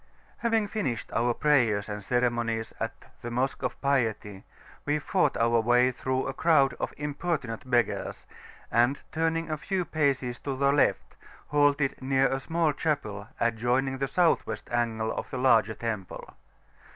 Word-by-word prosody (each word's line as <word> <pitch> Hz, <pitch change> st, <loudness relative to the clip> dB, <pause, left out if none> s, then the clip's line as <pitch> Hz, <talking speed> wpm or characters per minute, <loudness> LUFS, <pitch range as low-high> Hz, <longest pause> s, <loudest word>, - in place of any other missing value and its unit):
Having 225 Hz, -3 st, +1 dB
finished 130 Hz, -, -3 dB
our 120 Hz, +1 st, +2 dB
prayers 120 Hz, -9 st, +2 dB
and 105 Hz, -1 st, -5 dB
ceremonies 120 Hz, -1 st, 0 dB
at 115 Hz, 0 st, -5 dB, 0.2 s
the 120 Hz, -, -5 dB
Mosque 125 Hz, +3 st, -1 dB
of -, -, -3 dB
Piety, 115 Hz, -8 st, -1 dB, 0.4 s
we 145 Hz, +1 st, +1 dB
fought 150 Hz, 0 st, +1 dB
our 115 Hz, 0 st, +3 dB
way 120 Hz, +2 st, +4 dB
out -, -, -5 dB
through 130 Hz, +1 st, -2 dB
a 135 Hz, -, -3 dB
crowd 140 Hz, -5 st, +3 dB
of -, -, -2 dB
importunate 145 Hz, -5 st, -3 dB
beggars, 120 Hz, -2 st, 0 dB, 0.5 s
and 120 Hz, +4 st, +3 dB
turning 165 Hz, 0 st, -1 dB
a 155 Hz, -, -1 dB
few 185 Hz, +4 st, -2 dB
paces 135 Hz, -6 st, 0 dB
to 135 Hz, -2 st, -4 dB
the 140 Hz, +1 st, +3 dB
left, 145 Hz, -, +1 dB, 0.3 s
halted 145 Hz, -1 st, +2 dB
near 135 Hz, 0 st, +2 dB
a 135 Hz, -, -1 dB
small 160 Hz, +2 st, 0 dB
chapel 110 Hz, -10 st, -2 dB
adjoining 120 Hz, +3 st, 0 dB
the 135 Hz, -, 0 dB
South 175 Hz, +3 st, +3 dB
West -, -, -6 dB
angle 115 Hz, -2 st, 0 dB
of -, -, -5 dB
the 130 Hz, -, -4 dB
larger 115 Hz, -4 st, +3 dB
temple. 110 Hz, -5 st, -5 dB
130 Hz, 155 wpm, -28 LUFS, 115-145 Hz, 0.5 s, way